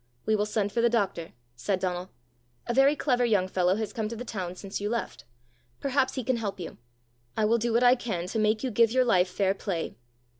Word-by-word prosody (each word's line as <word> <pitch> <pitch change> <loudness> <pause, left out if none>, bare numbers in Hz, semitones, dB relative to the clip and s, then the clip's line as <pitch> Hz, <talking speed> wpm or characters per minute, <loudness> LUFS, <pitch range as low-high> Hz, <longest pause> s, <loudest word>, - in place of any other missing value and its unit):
"We 220 - +3
will 210 0 0
send 210 -1 -1
for 230 - 0
the 235 - +4
doctor," 195 -7 -1 0.2
said 185 +10 -1
Donal. 180 0 -2 0.6
"A 240 - -1
very 270 +3 +5
clever 250 -4 +1
young 205 -6 +2
fellow 185 0 +2
has 215 -1 -3
come 220 -2 -2
to 230 - -5
the 245 +2 -6
town 185 -6 -4
since 195 +1 -6
you 205 - -1
left: 235 - -4 0.5
perhaps 275 -1 +1
he 260 - -2
can 255 +1 0
help 205 -4 -4
you. 170 - -7 0.6
I 215 - +3
will 230 +2 +3
do 235 +1 0
what 235 +2 +3
I 245 0 +7
can 215 -9 -3
to 220 - -1
make 215 +2 +2
you 260 - -1
give 230 +1 +4
your 255 +1 +3
life 185 -6 +3
fair 190 +1 +1
play." 190 -4 -3
215 Hz, 230 wpm, -28 LUFS, 190-240 Hz, 0.6 s, I